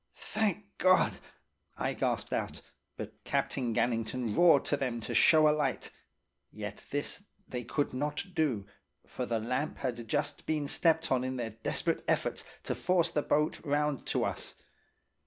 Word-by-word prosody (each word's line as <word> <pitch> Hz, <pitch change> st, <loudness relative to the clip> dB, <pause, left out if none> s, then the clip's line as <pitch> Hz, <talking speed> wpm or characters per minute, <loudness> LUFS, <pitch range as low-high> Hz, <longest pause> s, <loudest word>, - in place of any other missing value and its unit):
"'Thank 210 Hz, -2 st, -1 dB
God!' 185 Hz, -1 st, +4 dB, 0.6 s
I -, -, -1 dB
gasped -, -, -1 dB
out. -, -, -2 dB, 0.4 s
But -, -, -8 dB
Captain 125 Hz, -4 st, 0 dB
Gannington 115 Hz, 0 st, 0 dB
roared 170 Hz, -5 st, +6 dB
to -, -, +2 dB
them 125 Hz, -4 st, -2 dB
to -, -, -4 dB
show 155 Hz, -1 st, +6 dB
a 150 Hz, -, +5 dB
light. 135 Hz, -7 st, -1 dB, 0.6 s
Yet 105 Hz, -1 st, -7 dB
this 145 Hz, +7 st, -3 dB, 0.3 s
they 125 Hz, -1 st, -4 dB
could 140 Hz, +5 st, -1 dB
not 150 Hz, +6 st, -2 dB
do, 140 Hz, -, +1 dB, 0.4 s
for 125 Hz, -, -4 dB
the 115 Hz, -1 st, 0 dB
lamp 125 Hz, +7 st, -2 dB
had 120 Hz, -3 st, -3 dB
just 145 Hz, +5 st, -2 dB
been 150 Hz, -2 st, 0 dB
stepped 160 Hz, +2 st, +2 dB
on 130 Hz, -1 st, +3 dB
in 130 Hz, 0 st, -2 dB
their 120 Hz, -3 st, -3 dB
desperate 110 Hz, +2 st, -1 dB
efforts -, -, 0 dB, 0.2 s
to -, -, -1 dB
force 175 Hz, -2 st, +2 dB
the 150 Hz, -, +1 dB
boat 150 Hz, +1 st, +1 dB
round 145 Hz, -2 st, 0 dB
to -, -, +1 dB
us. -, -, -4 dB
140 Hz, 155 wpm, -31 LUFS, 120-155 Hz, 0.6 s, roared